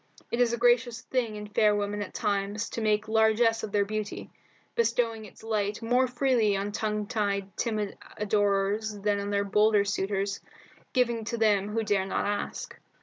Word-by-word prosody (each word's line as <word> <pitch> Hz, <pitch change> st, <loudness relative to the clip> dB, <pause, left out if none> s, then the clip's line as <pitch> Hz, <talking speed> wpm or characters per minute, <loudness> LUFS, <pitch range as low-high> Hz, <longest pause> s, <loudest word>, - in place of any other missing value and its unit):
It 235 Hz, -, +1 dB
is 240 Hz, -2 st, +3 dB
a 235 Hz, -, -1 dB
gracious 240 Hz, 0 st, +2 dB
thing 240 Hz, -5 st, -2 dB
in 210 Hz, 0 st, -6 dB
fair 210 Hz, 0 st, +3 dB
women 205 Hz, 0 st, -2 dB
at 205 Hz, -, -5 dB
times 205 Hz, +1 st, -1 dB
to 230 Hz, -, -3 dB
make 215 Hz, 0 st, +1 dB
largesse 220 Hz, +1 st, +3 dB
of 215 Hz, -, -5 dB
their 205 Hz, -1 st, +2 dB
beauty, 215 Hz, 0 st, -5 dB, 0.4 s
bestowing 230 Hz, -1 st, 0 dB
its 205 Hz, -, -15 dB
light 210 Hz, -2 st, -1 dB
more 250 Hz, +3 st, +3 dB
freely 245 Hz, -5 st, +2 dB
on 200 Hz, +1 st, -2 dB
tongue 210 Hz, 0 st, -2 dB
tied, 200 Hz, -3 st, -2 dB
timid 215 Hz, -3 st, -2 dB, 0.2 s
adorers 205 Hz, 0 st, 0 dB
than 205 Hz, 0 st, +1 dB
on 200 Hz, 0 st, -3 dB
their 200 Hz, 0 st, +1 dB
bolder 210 Hz, 0 st, +3 dB
suitors, 200 Hz, 0 st, -1 dB, 0.5 s
giving 235 Hz, -3 st, +1 dB
to 235 Hz, +1 st, -3 dB
them 210 Hz, -3 st, +2 dB
who 225 Hz, +1 st, -1 dB
dare 200 Hz, -3 st, +1 dB
not -, -, -1 dB
ask. 205 Hz, 0 st, -4 dB
210 Hz, 175 wpm, -28 LUFS, 205-225 Hz, 0.5 s, is